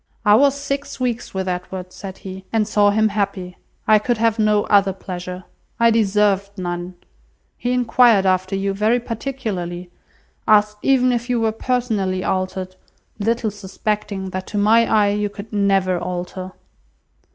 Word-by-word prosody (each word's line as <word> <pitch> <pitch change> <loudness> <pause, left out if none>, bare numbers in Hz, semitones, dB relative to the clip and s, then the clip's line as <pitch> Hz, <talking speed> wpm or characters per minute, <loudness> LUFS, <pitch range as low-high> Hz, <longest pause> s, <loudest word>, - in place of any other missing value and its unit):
"I 205 - +6
was 275 +5 +5
six 280 0 -4
weeks 240 -5 -3
with 190 0 -2
Edward," 180 0 -5
said 195 -2 -8
he, 190 0 -9
"and 220 -2 +1
saw 205 -1 +3
him 215 +1 +2
happy. 200 -3 -3 0.3
I 215 -1 +6
could 240 +2 -1
have 225 0 +1
no 210 -1 +3
other 200 -2 +3
pleasure. 180 -1 -7 0.4
I 230 0 +5
deserved 205 -2 +1
none. 175 0 -4 0.6
He 245 - -2
enquired 240 -4 +4
after 185 0 +1
you 195 0 -1
very 215 +5 +2
particularly; 215 -8 -5 0.6
asked 210 0 +4
even 255 -2 +3
if 240 0 -2
you 245 -1 +1
were 225 -1 +1
personally 220 -6 -1
altered, 185 0 -2 0.4
little 225 +1 0
suspecting 200 -1 -4
that 185 0 -5
to 210 - -4
my 225 +3 +4
eye 210 -2 +4
you 205 0 -1
could 205 +2 -10
never 195 -3 +2
alter." 180 +1 -5
205 Hz, 150 wpm, -20 LUFS, 185-225 Hz, 0.6 s, I